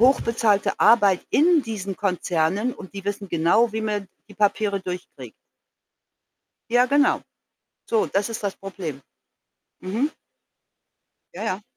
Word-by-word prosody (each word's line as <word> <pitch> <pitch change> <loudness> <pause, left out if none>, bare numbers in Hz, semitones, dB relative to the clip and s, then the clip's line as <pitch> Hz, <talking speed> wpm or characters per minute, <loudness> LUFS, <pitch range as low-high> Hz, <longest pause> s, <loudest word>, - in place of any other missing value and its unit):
hochbezahlte 230 -5 +2
Arbeit 205 -6 +5
in 325 0 +4
diesen 200 -4 -5
Konzernen 185 +3 0
und 190 -2 -11
die 195 -1 -8
wissen 205 -1 -4
genau, 175 +8 +3
wie 220 - -2
man 210 -3 -2 0.2
die 205 - -14
Papiere 205 -1 +1
durchkriegt. 180 -1 -7 1.4
Ja, 245 +1 +4
genau. 285 +2 +3 0.7
So, 225 -2 +2
das 200 +3 -1
ist 220 -2 -6
das 200 - -2
Problem. 175 -8 -7 0.8
Mhm. 225 +11 -1 1.2
Ja, - - -5
ja. 190 +3 -2
205 Hz, 120 wpm, -23 LUFS, 190-230 Hz, 1.4 s, Arbeit